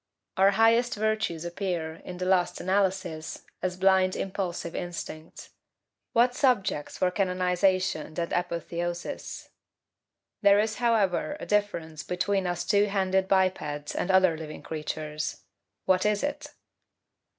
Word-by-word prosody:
Our 195 Hz, +1 st, +5 dB
highest 230 Hz, +2 st, +4 dB
virtues 215 Hz, -6 st, -1 dB
appear, 170 Hz, -3 st, -3 dB
in 180 Hz, -, -7 dB
the 180 Hz, -, -3 dB
last 180 Hz, -1 st, +2 dB
analysis, 185 Hz, -4 st, -1 dB, 0.2 s
as 180 Hz, -1 st, -2 dB
blind, 190 Hz, 0 st, +4 dB
impulsive 180 Hz, -3 st, -3 dB
instincts. 165 Hz, -2 st, -7 dB, 0.6 s
What 245 Hz, +2 st, +4 dB
subjects 240 Hz, -, +1 dB
for 180 Hz, -, +2 dB
canonization 185 Hz, -3 st, 0 dB
and 170 Hz, -, -2 dB
apotheosis! 175 Hz, 0 st, -3 dB, 0.9 s
There 200 Hz, 0 st, +6 dB
is, 215 Hz, 0 st, 0 dB
however, 230 Hz, +3 st, +1 dB
a -, -, -6 dB
difference 170 Hz, -7 st, -1 dB
between 185 Hz, +1 st, -1 dB
us 175 Hz, -1 st, -2 dB
two 205 Hz, -1 st, +4 dB
handed 190 Hz, -1 st, +1 dB
bipeds 180 Hz, -7 st, 0 dB
and 180 Hz, -, -2 dB
other 185 Hz, -3 st, +5 dB
living 155 Hz, -1 st, -8 dB
creatures 155 Hz, -1 st, -4 dB, 0.4 s
what 185 Hz, -1 st, +3 dB
is 210 Hz, -1 st, +1 dB
it? 290 Hz, 0 st, -3 dB
185 Hz, 120 wpm, -27 LUFS, 170-200 Hz, 0.9 s, There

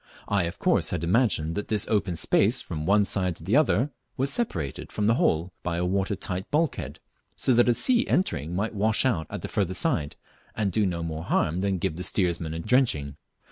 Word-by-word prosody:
I 100 Hz, -3 st, +1 dB
of 85 Hz, -, -5 dB
course -, -, +2 dB
had 75 Hz, -, -3 dB
imagined 85 Hz, -4 st, +1 dB
that 105 Hz, -, -4 dB
this 110 Hz, -1 st, 0 dB
open 100 Hz, -5 st, 0 dB
space 110 Hz, +8 st, +3 dB
from 80 Hz, -3 st, -5 dB
one 100 Hz, +1 st, +4 dB
side 90 Hz, -3 st, 0 dB
to -, -, -11 dB
the 100 Hz, +8 st, +1 dB
other 145 Hz, -2 st, +3 dB, 0.3 s
was 135 Hz, +2 st, 0 dB
separated 85 Hz, -, -3 dB
from 105 Hz, -, -1 dB
the 110 Hz, -, +4 dB
hold 85 Hz, -6 st, +1 dB
by 85 Hz, -1 st, -2 dB
a 90 Hz, -, 0 dB
water 95 Hz, +3 st, 0 dB
tight 95 Hz, 0 st, -5 dB
bulkhead, 155 Hz, 0 st, -1 dB, 0.4 s
so 130 Hz, -, +3 dB
that 120 Hz, +1 st, +4 dB
a -, -, +5 dB
sea 250 Hz, -, +2 dB
entering 85 Hz, -, 0 dB
might 105 Hz, +5 st, -1 dB
wash 110 Hz, +4 st, +1 dB
out 95 Hz, -, 0 dB
at -, -, -6 dB
the -, -, -3 dB
further 95 Hz, -3 st, -1 dB
side, 80 Hz, -, 0 dB, 0.4 s
and 105 Hz, -3 st, 0 dB
do 105 Hz, +2 st, +2 dB
no 85 Hz, -2 st, -3 dB
more 80 Hz, 0 st, -5 dB
harm 85 Hz, +4 st, 0 dB
than 100 Hz, -1 st, 0 dB
give 80 Hz, -2 st, -2 dB
the 90 Hz, -, -4 dB
steersmen 85 Hz, -5 st, -1 dB
a -, -, -4 dB
drenching. 95 Hz, -, +1 dB
95 Hz, 215 wpm, -26 LUFS, 85-115 Hz, 0.4 s, a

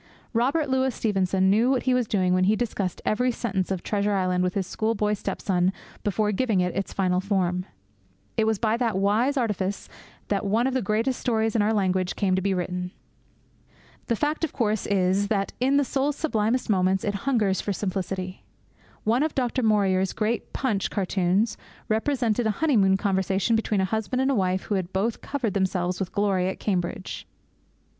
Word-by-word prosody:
Robert 275 Hz, +7 st, +1 dB
Louis 265 Hz, 0 st, +1 dB
Stevenson 190 Hz, -3 st, +1 dB
knew 225 Hz, +5 st, +3 dB
what 260 Hz, -2 st, +1 dB
he 255 Hz, -, +2 dB
was 250 Hz, -3 st, +1 dB
doing 185 Hz, -4 st, +1 dB
when 185 Hz, 0 st, +3 dB
he 210 Hz, +3 st, +4 dB
discussed 205 Hz, -5 st, -3 dB
every 250 Hz, +4 st, +2 dB
sentence 195 Hz, -6 st, -2 dB
of 190 Hz, -2 st, -2 dB
Treasure 205 Hz, 0 st, 0 dB
Island 185 Hz, -1 st, +1 dB
with 180 Hz, 0 st, -1 dB
his 195 Hz, -2 st, 0 dB
schoolboy 215 Hz, +1 st, 0 dB
step 205 Hz, -, -4 dB
son 185 Hz, -2 st, +1 dB, 0.3 s
before 210 Hz, +1 st, +1 dB
giving 215 Hz, -2 st, +1 dB
it 180 Hz, -1 st, 0 dB
its 195 Hz, +1 st, -2 dB
final 185 Hz, -2 st, +1 dB
form. 185 Hz, -2 st, 0 dB, 0.7 s
It 220 Hz, -, +2 dB
was 220 Hz, -1 st, +2 dB
by 220 Hz, +2 st, +1 dB
that 230 Hz, -5 st, 0 dB
wise 220 Hz, +8 st, +2 dB
artifice 205 Hz, -5 st, -1 dB, 0.4 s
that 200 Hz, -1 st, 0 dB
one 215 Hz, +4 st, +1 dB
of 265 Hz, -, 0 dB
the 260 Hz, -, +1 dB
greatest 225 Hz, +5 st, 0 dB
stories 225 Hz, -2 st, 0 dB
in 220 Hz, -, +3 dB
our 210 Hz, +1 st, +2 dB
language 185 Hz, -3 st, 0 dB
came 190 Hz, -2 st, +1 dB
to 190 Hz, -, 0 dB
be 195 Hz, +1 st, 0 dB
written. 180 Hz, 0 st, -3 dB, 1.2 s
The 235 Hz, -, +1 dB
fact, 300 Hz, +7 st, -1 dB
of 325 Hz, -, -1 dB
course, 215 Hz, -4 st, 0 dB
is 195 Hz, 0 st, +2 dB
that 200 Hz, -2 st, -1 dB
in 265 Hz, +3 st, +3 dB
the 285 Hz, -, +3 dB
soul's 275 Hz, +2 st, 0 dB
sublimest 245 Hz, -5 st, 0 dB
moments 190 Hz, -2 st, +2 dB
it 205 Hz, -, -1 dB, 0.2 s
hungers 210 Hz, -7 st, +2 dB
for 205 Hz, -, -2 dB
simplicity. 185 Hz, -1 st, -3 dB, 0.6 s
One 230 Hz, +4 st, +2 dB
of 310 Hz, 0 st, 0 dB
Du 255 Hz, 0 st, 0 dB
Maurier's 195 Hz, -4 st, +2 dB
great 225 Hz, +2 st, -2 dB
Punch 220 Hz, -8 st, -1 dB
cartoons 195 Hz, +2 st, 0 dB, 0.3 s
represented 230 Hz, 0 st, +1 dB
a 210 Hz, -, -1 dB
honeymoon 210 Hz, -12 st, +3 dB
conversation 195 Hz, +2 st, +1 dB
between 215 Hz, -3 st, +1 dB
a -, -, +2 dB
husband 220 Hz, +5 st, -2 dB
and 270 Hz, 0 st, +2 dB
wife 185 Hz, -2 st, 0 dB
who -, -, -3 dB
had 185 Hz, -2 st, -2 dB
both 215 Hz, +4 st, -1 dB
covered 255 Hz, -8 st, -2 dB
themselves 185 Hz, -2 st, 0 dB
with 190 Hz, -2 st, -3 dB
glory 195 Hz, -3 st, +1 dB
at 190 Hz, -, -4 dB
Cambridge. 185 Hz, -2 st, -3 dB
205 Hz, 185 wpm, -25 LUFS, 190-230 Hz, 1.2 s, he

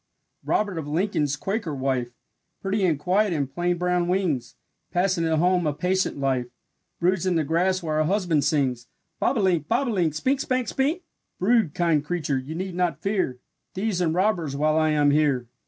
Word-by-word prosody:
Robert 200 Hz, -5 st, 0 dB
of 150 Hz, -, -6 dB
Lincoln's 155 Hz, -3 st, 0 dB
Quaker 195 Hz, -2 st, -3 dB
wife, 130 Hz, -2 st, -1 dB, 0.5 s
Pretty 195 Hz, +1 st, -1 dB
and 165 Hz, -5 st, +2 dB
quiet 185 Hz, +6 st, +1 dB
in 145 Hz, -3 st, 0 dB
plain 175 Hz, +6 st, -1 dB
brown 180 Hz, 0 st, 0 dB
wings, 160 Hz, -11 st, -1 dB, 0.4 s
Passing 180 Hz, -1 st, +1 dB
at 160 Hz, -1 st, +1 dB
home 175 Hz, 0 st, +2 dB
a 150 Hz, -, 0 dB
patient 185 Hz, +2 st, 0 dB
life, 130 Hz, -3 st, 0 dB, 0.5 s
Broods 185 Hz, +1 st, +1 dB
in 180 Hz, -, +2 dB
the 160 Hz, -, +2 dB
grass 180 Hz, +5 st, +1 dB
while 155 Hz, -2 st, -1 dB
her 155 Hz, -, +3 dB
husband 175 Hz, -5 st, +1 dB
sings: 130 Hz, -5 st, 0 dB, 0.3 s
"Bobolink, 185 Hz, -, +1 dB
bob 245 Hz, +3 st, +1 dB
o -, -, 0 dB
link, 170 Hz, -7 st, 0 dB
Spink, 260 Hz, -, +1 dB
spank, 255 Hz, -3 st, -1 dB
spink; 305 Hz, +7 st, 0 dB, 0.3 s
Brood, 210 Hz, -5 st, +2 dB
kind 165 Hz, -4 st, +2 dB
creature, 150 Hz, -4 st, -1 dB
you 140 Hz, +5 st, -7 dB
need 185 Hz, +1 st, -4 dB
not 170 Hz, -4 st, -1 dB
fear 195 Hz, -11 st, 0 dB, 0.4 s
Thieves 190 Hz, -1 st, -1 dB
and 165 Hz, -2 st, +1 dB
robbers 180 Hz, -7 st, +1 dB
while 155 Hz, +2 st, +2 dB
I 155 Hz, 0 st, +3 dB
am 145 Hz, -1 st, +3 dB
here! 145 Hz, -4 st, +2 dB
170 Hz, 180 wpm, -25 LUFS, 150-190 Hz, 0.5 s, her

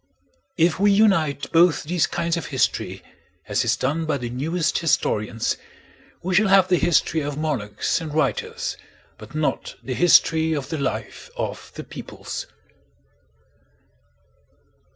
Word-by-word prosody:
If 165 Hz, 0 st, +2 dB
we 205 Hz, +1 st, +4 dB
unite 190 Hz, -9 st, +2 dB
both 170 Hz, 0 st, +4 dB
these 170 Hz, +2 st, +1 dB
kinds 170 Hz, 0 st, -1 dB
of 170 Hz, -, -4 dB
history, 130 Hz, -3 st, -1 dB, 0.4 s
as -, -, +1 dB
is -, -, +1 dB
done 155 Hz, +5 st, -1 dB
by 150 Hz, -2 st, +1 dB
the 120 Hz, -2 st, -5 dB
newest 155 Hz, +5 st, 0 dB
historians, 115 Hz, -7 st, 0 dB, 0.7 s
we 185 Hz, +2 st, -1 dB
shall 210 Hz, +4 st, +4 dB
have 190 Hz, -1 st, +5 dB
the 180 Hz, -, +3 dB
history 165 Hz, -1 st, +2 dB
of 145 Hz, 0 st, -4 dB
monarchs 145 Hz, -, -1 dB
and 160 Hz, -2 st, -5 dB
writers, 150 Hz, -3 st, -1 dB, 0.4 s
but -, -, -12 dB
not 155 Hz, -1 st, -1 dB
the 130 Hz, -, -3 dB
history 160 Hz, 0 st, +4 dB
of 145 Hz, -4 st, -3 dB
the 160 Hz, -, -3 dB
life 115 Hz, -5 st, -4 dB
of -, -, -4 dB
the -, -, -6 dB
peoples. -, -, -7 dB
160 Hz, 135 wpm, -23 LUFS, 140-175 Hz, 0.7 s, have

